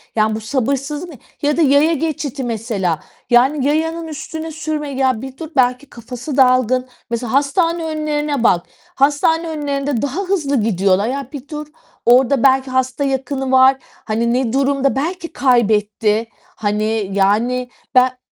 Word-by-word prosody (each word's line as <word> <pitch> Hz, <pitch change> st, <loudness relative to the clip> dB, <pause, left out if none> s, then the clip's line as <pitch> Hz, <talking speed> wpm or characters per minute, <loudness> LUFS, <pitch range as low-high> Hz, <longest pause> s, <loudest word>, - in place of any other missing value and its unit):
Ya, 215 Hz, 0 st, +2 dB
bu 220 Hz, -, -5 dB
sabırsızlık 275 Hz, +7 st, -2 dB
ne? 285 Hz, -, -11 dB, 0.2 s
Ya 295 Hz, +2 st, +1 dB
da -, -, +3 dB
yaya 295 Hz, +3 st, +4 dB
geçidi 290 Hz, -3 st, -3 dB
mesela. 215 Hz, -8 st, -2 dB, 0.3 s
Yani 265 Hz, +3 st, +3 dB
yayanın 325 Hz, +2 st, -1 dB
üstüne 315 Hz, +1 st, -6 dB
sürme, 305 Hz, -1 st, -4 dB
ya, 260 Hz, -4 st, 0 dB
bir 265 Hz, 0 st, -8 dB
dur, 320 Hz, -2 st, -7 dB
belki 255 Hz, +2 st, +1 dB
kafası 245 Hz, +4 st, -7 dB
dalgın. 255 Hz, -1 st, +3 dB, 0.2 s
Mesela 235 Hz, 0 st, -3 dB
hastane 330 Hz, +4 st, +1 dB
önlerine 300 Hz, -4 st, -2 dB
bak. 175 Hz, -6 st, +3 dB, 0.3 s
Hastane 295 Hz, +4 st, +2 dB
önlerinde 285 Hz, -4 st, -2 dB
daha 285 Hz, +8 st, -2 dB
hızlı 310 Hz, -, 0 dB
gidiyorlar. 195 Hz, 0 st, +2 dB
Ya, 275 Hz, 0 st, -3 dB
bir 285 Hz, 0 st, -8 dB
dur. 300 Hz, -1 st, -6 dB, 0.4 s
Orada 255 Hz, +2 st, +4 dB
belki 265 Hz, -1 st, +3 dB
hasta 260 Hz, +2 st, 0 dB
yakını 270 Hz, 0 st, -2 dB
var. 260 Hz, +1 st, +6 dB, 0.3 s
Hani 235 Hz, +2 st, 0 dB
ne 250 Hz, -2 st, 0 dB
durumda? 275 Hz, 0 st, +1 dB
Belki 335 Hz, +4 st, -3 dB
kaybetti. 220 Hz, -3 st, +2 dB, 0.3 s
Hani, 215 Hz, -1 st, -1 dB
yani 235 Hz, +6 st, +1 dB, 0.3 s
ben 255 Hz, 0 st, +4 dB
265 Hz, 145 wpm, -18 LUFS, 235-295 Hz, 0.4 s, var